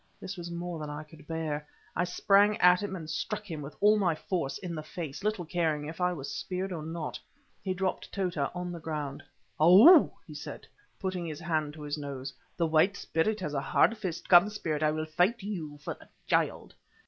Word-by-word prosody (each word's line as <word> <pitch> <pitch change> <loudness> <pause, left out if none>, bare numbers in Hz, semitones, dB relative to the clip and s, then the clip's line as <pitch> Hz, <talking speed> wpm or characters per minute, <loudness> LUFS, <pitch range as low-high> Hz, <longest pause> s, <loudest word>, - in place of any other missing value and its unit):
This 190 - -6
was 175 -1 -7
more 170 -1 -4
than 150 -1 -5
I 150 +1 -5
could 150 -1 -16
bear. 155 -2 -3 0.3
I 180 - +1
sprang 200 +3 +4
at 180 -1 +6
him 205 -2 -3
and 165 -4 -7
struck 210 +7 -3
him 155 -2 -4
with 140 +1 -8
all 210 +1 +5
my 175 -5 +2
force 170 -5 -2
in 180 -3 -6
the 155 - -4
face, 155 0 -7
little 210 -4 -1
caring 160 -3 0
if 160 +4 -7
I 180 0 +3
was 145 -6 -5
speared 185 +1 -3
or 170 -3 -4
not. 160 0 -5 0.4
He 185 -1 -2
dropped 190 0 -2
Tota 175 -8 -1
on 180 0 -3
the 170 - -6
ground. 150 -3 -4 0.4
"Ou!" 210 - +9
he - - -11
said, - - -8 0.3
putting 185 -3 -3
his 155 -2 -5
hand 155 -3 -1
to 155 - -9
his 145 +1 -3
nose, 135 -2 -6 0.2
"the 170 - +2
White 165 +5 +3
Spirit 210 +7 0
has 150 -4 -3
a 140 - 0
hard 175 +10 +3
fist. 185 -6 -5
Come, 175 +3 +7
Spirit, 160 -8 -3
I 155 - +4
will 155 +1 -2
fight 180 +8 +1
you 165 -8 -5
for 145 - -5
the - - -18 0.2
child." - - 0
170 Hz, 210 wpm, -30 LUFS, 155-185 Hz, 0.4 s, Ou